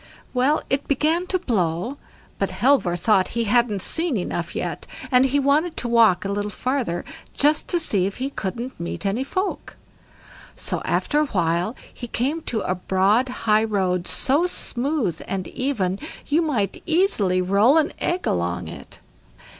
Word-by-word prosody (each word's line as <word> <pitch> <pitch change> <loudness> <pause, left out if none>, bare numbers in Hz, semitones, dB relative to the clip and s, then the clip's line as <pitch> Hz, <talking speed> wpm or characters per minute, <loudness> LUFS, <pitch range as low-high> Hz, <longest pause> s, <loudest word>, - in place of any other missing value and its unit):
Well, 265 +4 +2
it 270 +1 -1
began 315 +6 +1
to 370 - +1
blow, 220 - -1 0.4
but - - 0
Halvor 250 -10 +2
thought 190 +1 +3
he 235 - +2
hadn't 225 -3 +2
seen 330 -7 0
enough 180 - -3
yet, - - -4 0.2
and 250 0 +5
he 275 +2 +1
wanted 295 +5 +2
to 245 - -1
walk 225 -6 +4
a - - -1
little 205 +1 -2
farther 250 -4 -2 0.3
just 300 +1 +3
to 345 - +1
see 200 - +1
if 195 - -6
he 265 +2 -3
couldn't 240 +4 -5
meet 170 +4 -5
any 205 +6 0
folk. 375 +8 -3 0.8
So - - -3
after 295 - +1
a 305 - +3
while 175 +2 0 0.2
he 240 - -7
came 275 +8 -1
to 220 -3 -1
a 185 - -1
broad 190 +7 +2 0.2
high 215 0 +4
road, 185 -5 0
so 295 +7 +2
smooth 250 - -1
and 190 -2 -3
even, 205 -8 -1 0.3
you 305 +4 +2
might 235 - -1
easily 315 - +2
roll 200 - +4
an 315 - +2
egg 360 +1 -1
along 90 -1 -1
it. - - -10
235 Hz, 160 wpm, -23 LUFS, 190-285 Hz, 0.8 s, and